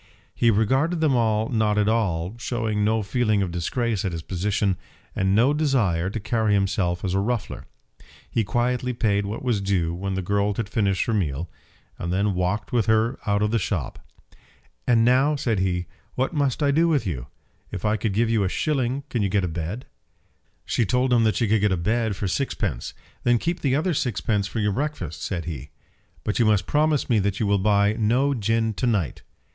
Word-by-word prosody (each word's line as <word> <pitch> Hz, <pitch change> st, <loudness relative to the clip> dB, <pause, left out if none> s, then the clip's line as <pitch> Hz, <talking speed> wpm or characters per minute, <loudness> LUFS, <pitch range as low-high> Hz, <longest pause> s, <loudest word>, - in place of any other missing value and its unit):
He 115 Hz, -, +2 dB
regarded 130 Hz, -, +2 dB
them 155 Hz, -4 st, +3 dB
all 110 Hz, -2 st, +1 dB
not 110 Hz, -3 st, +1 dB
at 105 Hz, -1 st, +2 dB
all, 100 Hz, -4 st, 0 dB
showing 110 Hz, -4 st, -1 dB
no 110 Hz, +1 st, +1 dB
feeling 110 Hz, -1 st, +1 dB
of 90 Hz, -, -3 dB
disgrace 105 Hz, +5 st, -1 dB
at 95 Hz, -4 st, -2 dB
his 80 Hz, -1 st, -5 dB
position, 95 Hz, +1 st, 0 dB, 0.4 s
and 95 Hz, 0 st, +1 dB
no 125 Hz, +7 st, +4 dB
desire 115 Hz, -, +1 dB
to 110 Hz, -, -4 dB
carry 110 Hz, -1 st, +1 dB
himself 95 Hz, -2 st, 0 dB
as 90 Hz, -, -1 dB
a 95 Hz, -, +2 dB
ruffler. 115 Hz, +1 st, -3 dB, 0.6 s
He 115 Hz, -, 0 dB
quietly 125 Hz, +4 st, 0 dB
paid 105 Hz, -4 st, 0 dB
what 110 Hz, +5 st, -5 dB
was 120 Hz, -6 st, 0 dB
due 90 Hz, -4 st, 0 dB
when 95 Hz, +2 st, -3 dB
the 95 Hz, -, -2 dB
girl 100 Hz, +2 st, 0 dB
had 115 Hz, -1 st, -2 dB
finished 100 Hz, -3 st, +1 dB
her 115 Hz, -, -1 dB
meal, 80 Hz, -5 st, -2 dB, 0.5 s
and 85 Hz, -, -3 dB
then 100 Hz, +2 st, +1 dB
walked 90 Hz, +3 st, -1 dB
with 115 Hz, -5 st, +1 dB
her 110 Hz, +3 st, +2 dB
out 100 Hz, 0 st, +2 dB
of 105 Hz, -, +1 dB
the 115 Hz, -, +2 dB
shop. 90 Hz, -, -3 dB, 0.9 s
"And 115 Hz, -2 st, +4 dB
now," 130 Hz, +5 st, +4 dB
said 115 Hz, -7 st, 0 dB
he, 90 Hz, -1 st, 0 dB, 0.3 s
"what 130 Hz, +6 st, -1 dB
must 145 Hz, -1 st, 0 dB
I 140 Hz, -, +3 dB
do 165 Hz, +4 st, +3 dB
with 150 Hz, -8 st, +1 dB
you? 70 Hz, -9 st, -4 dB, 0.4 s
If -, -, -5 dB
I 105 Hz, 0 st, +2 dB
give 110 Hz, +2 st, 0 dB
you 110 Hz, -2 st, +2 dB
a 95 Hz, -, 0 dB
shilling 135 Hz, +2 st, -1 dB
can 120 Hz, -, -1 dB
you 100 Hz, -, +1 dB
get 100 Hz, 0 st, +1 dB
a -, -, 0 dB
bed?" 85 Hz, +8 st, -4 dB, 0.8 s
She -, -, +1 dB
told 125 Hz, +3 st, +1 dB
him 115 Hz, -2 st, +4 dB
that 110 Hz, -, +2 dB
she 115 Hz, -, +1 dB
could 105 Hz, 0 st, +2 dB
get 105 Hz, -1 st, +2 dB
a 95 Hz, -, +1 dB
bed 110 Hz, +4 st, 0 dB
for 100 Hz, +1 st, -3 dB
sixpence. 95 Hz, -, -2 dB, 0.3 s
"Then 120 Hz, 0 st, +4 dB
keep 170 Hz, +9 st, -2 dB
the 135 Hz, -2 st, +1 dB
other 170 Hz, +5 st, +1 dB
sixpence 110 Hz, -6 st, 0 dB
for 110 Hz, -, -4 dB
your 105 Hz, -1 st, +1 dB
breakfast," 95 Hz, -, -3 dB
said 85 Hz, -5 st, -3 dB
he. 75 Hz, -4 st, -6 dB, 0.5 s
"But 105 Hz, -, -1 dB
you 120 Hz, -, +4 dB
must 105 Hz, -4 st, +3 dB
promise 150 Hz, -1 st, +1 dB
me 115 Hz, -3 st, +3 dB
that 100 Hz, 0 st, -1 dB
you 110 Hz, -, +1 dB
will 100 Hz, 0 st, +2 dB
buy 100 Hz, +1 st, +3 dB
no 120 Hz, +6 st, +2 dB
gin 115 Hz, -1 st, 0 dB
to 125 Hz, -, -1 dB
night." 100 Hz, -, -1 dB
105 Hz, 205 wpm, -24 LUFS, 95-120 Hz, 0.9 s, no